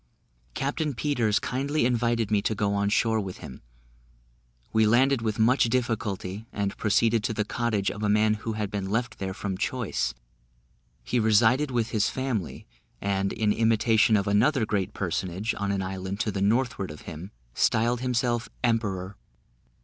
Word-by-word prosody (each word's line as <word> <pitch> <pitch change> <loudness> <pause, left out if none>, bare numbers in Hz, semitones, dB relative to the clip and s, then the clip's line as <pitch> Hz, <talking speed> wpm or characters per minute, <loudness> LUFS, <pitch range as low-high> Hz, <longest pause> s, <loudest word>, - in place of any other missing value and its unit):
Captain 145 +1 -2
Peters 115 -5 +1
kindly 140 +2 -1
invited 120 -3 +1
me 105 -1 +3
to 110 - -1
go 100 0 0
on 100 0 +1
shore 110 +1 +2
with 95 -3 -5
him. 65 - -10 1.1
We 110 -1 +4
landed 130 +3 +3
with 110 -2 -2
much 120 +4 +4
difficulty, 110 -4 -2
and 100 -1 -2
proceeded 115 +1 +2
to 110 - -1
the 105 -1 0
cottage 110 -4 -1
of 105 - -8
a 105 - 0
man 105 +1 +3
who 115 - -3
had 105 -2 -3
been 100 -2 -3
left 115 +2 -2
there 95 -1 -4
from 95 -3 -4
choice; 105 - -1 0.9
he 125 - 0
resided 110 +6 +4
with 120 -3 -1
his 105 -2 +1
family: 125 - -3 0.3
and, 100 0 -1
in 105 -1 +1
imitation 110 0 +3
of 100 - 0
another 110 +5 +3
great 100 -3 -2
personage 95 +3 -2
on 100 -1 -1
an 100 -1 -1
island 95 +1 -4
to 110 - 0
the 95 0 -3
northward 110 -1 +1
of 75 - -9
him, 80 +5 -8 0.2
styled 120 - +2
himself 120 -2 0
"Emperor." 100 -5 -1
110 Hz, 165 wpm, -26 LUFS, 100-120 Hz, 1.1 s, We